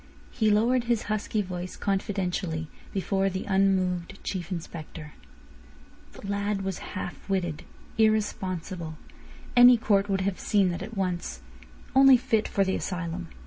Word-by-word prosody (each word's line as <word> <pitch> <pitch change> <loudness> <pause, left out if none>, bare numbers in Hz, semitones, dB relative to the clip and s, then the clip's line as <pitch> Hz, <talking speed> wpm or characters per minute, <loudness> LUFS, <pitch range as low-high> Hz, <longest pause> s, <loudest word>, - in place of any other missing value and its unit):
He 220 -3 +1
lowered 235 +4 +3
his 235 -2 +1
husky 215 0 -1
voice 180 -1 -6
confidentially 190 -5 -2 0.2
before 195 0 0
the 190 0 -4
unmoved 190 -2 +1
Chief 185 -1 -4
Inspector. 160 -3 -7 1.0
"The - - -10
lad 200 0 -1
was 190 -1 -3 0.2
half 175 0 -6
witted, 175 -5 -1 0.4
irresponsible. 185 -6 0 0.6
Any 245 0 +9
court 205 -2 +2
would 195 -1 +1
have 190 0 -1
seen 200 -3 +2
that 175 - -5
at 215 +2 -7
once. 175 - -2 0.5
Only 270 -1 +8
fit 225 -2 0
for 195 - +1
the 190 0 0
asylum. 175 -1 -4
195 Hz, 135 wpm, -27 LUFS, 180-210 Hz, 1.0 s, Any